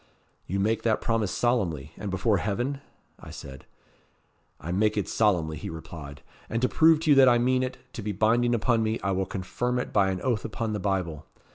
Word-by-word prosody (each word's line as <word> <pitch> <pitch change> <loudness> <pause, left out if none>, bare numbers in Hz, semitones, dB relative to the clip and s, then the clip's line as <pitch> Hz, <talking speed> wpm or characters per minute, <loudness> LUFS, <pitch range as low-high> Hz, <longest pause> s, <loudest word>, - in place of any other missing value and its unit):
'You 100 +3 -2
make 110 +3 +1
that 110 -2 +1
promise 115 -4 0
solemnly, 90 - 0
and 105 - -5
before 100 +3 +1
heaven?' 120 +8 -2 0.4
I - - -11
said. 65 -1 -10 0.9
'I 80 +5 -5
make 105 +3 +1
it 100 - 0
solemnly,' 85 -8 +1
he - - -6
replied. 80 -3 -9 0.3
'And 115 - -1
to - - +5
prove 160 +1 +4
to 160 -2 +2
you - - +7
that 130 -1 +8
I 120 - +5
mean 130 +2 +2
it 130 0 -3 0.2
to - - -6
be 105 0 -3
binding 120 +4 +2
upon 115 0 +2
me, 110 0 0
I 95 - 0
will 95 0 -1
confirm 120 +7 -2
it 125 - -3
by 100 -2 +3
an 95 -1 -2
oath 120 -4 0
upon 110 0 -3
the 105 - -2
Bible.' 90 -6 -2
105 Hz, 210 wpm, -27 LUFS, 95-120 Hz, 0.9 s, that